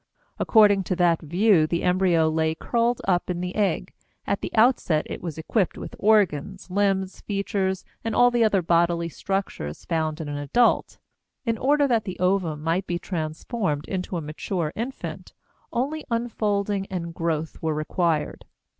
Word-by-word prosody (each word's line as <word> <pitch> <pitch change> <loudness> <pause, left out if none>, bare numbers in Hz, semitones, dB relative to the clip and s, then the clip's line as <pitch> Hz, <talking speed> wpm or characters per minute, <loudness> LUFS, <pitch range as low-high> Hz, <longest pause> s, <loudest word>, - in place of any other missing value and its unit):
According 205 -3 +5
to 185 - -1
that 170 -2 +3
view 175 +1 +3
the 170 +1 -1
embryo 180 -3 +3
lay 160 0 +1
curled 235 +6 0
up 180 -2 +1
in 175 -1 -1
the 180 0 -3
egg; 190 -3 0 0.3
at 200 - -1
the - - -3
outset 220 -9 +3
it - - -6
was 165 -4 -5
equipped 180 +4 0
with - - -7
organs, 190 -3 +1
limbs, 195 -1 0
features, 195 -2 -2 0.2
and 225 -1 -2
all 245 0 +6
the 240 -1 +3
other 200 -4 +3
bodily 170 0 +2
structures 195 - -4
found 160 -2 -1
in 160 - -5
an 145 0 -4
adult. 230 - +2 0.5
In 230 -1 +1
order 285 +5 +3
that 230 -5 +1
the 185 - -5
ovum 180 -5 0
might 170 +4 0
be 175 - -1
transformed 160 - -3
into 185 -1 -3
a - - -3
mature 155 +2 -3
infant, 250 +4 -6 0.4
only 285 +6 -2
unfolding 205 -4 -1
and 170 -3 -4
growth 160 -2 -2
were 160 -1 0
required. 155 0 -1
185 Hz, 160 wpm, -25 LUFS, 165-210 Hz, 0.5 s, all